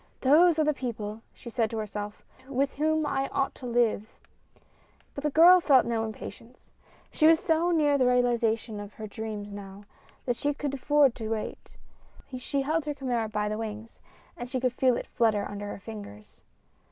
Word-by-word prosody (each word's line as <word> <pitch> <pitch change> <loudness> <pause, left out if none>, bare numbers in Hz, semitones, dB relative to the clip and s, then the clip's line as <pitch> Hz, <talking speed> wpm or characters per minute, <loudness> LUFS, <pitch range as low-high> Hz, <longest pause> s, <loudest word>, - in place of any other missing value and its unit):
"Those 320 +5 +5
are 310 - +3
the 305 0 +2
people," 225 -5 -5
she 235 - -11
said 225 -2 0
to 225 - -5
herself, 210 -1 -5 0.2
"with 275 +1 0
whom 310 +1 +1
I 270 -2 -1
ought 275 0 -1
to 250 - -9
live." 230 -3 +1 1.0
But 280 - -7
the 300 - +1
girl 345 +5 +7
felt 275 -6 +5
no 230 -1 -1
impatience. 230 +2 -10 0.4
She 310 - +4
was 325 0 +6
so 325 +2 +1
near 295 -4 +3
the 255 - +4
realization 235 -3 +1
of 205 0 -9
her 220 - -7
dreams 210 -1 -6
now, 200 0 -9 0.4
that 245 -2 -1
she 290 +3 -1
could 285 -1 -3
afford 280 -1 +3
to 220 -3 -5
wait. 220 -1 -5 0.6
She 275 +2 -2
held 310 +2 0
her 295 -1 -3
chimera 240 -5 -2
by 210 0 -1
the 215 +1 -3
wings 220 0 -7 0.4
and 240 0 -7
she 255 - -2
could 250 -1 0
feel 255 -1 +2
it - - -5
flutter 220 -4 +1
under 205 0 -6
her 205 - -6
fingers. 200 - -11
245 Hz, 185 wpm, -28 LUFS, 215-280 Hz, 1.0 s, girl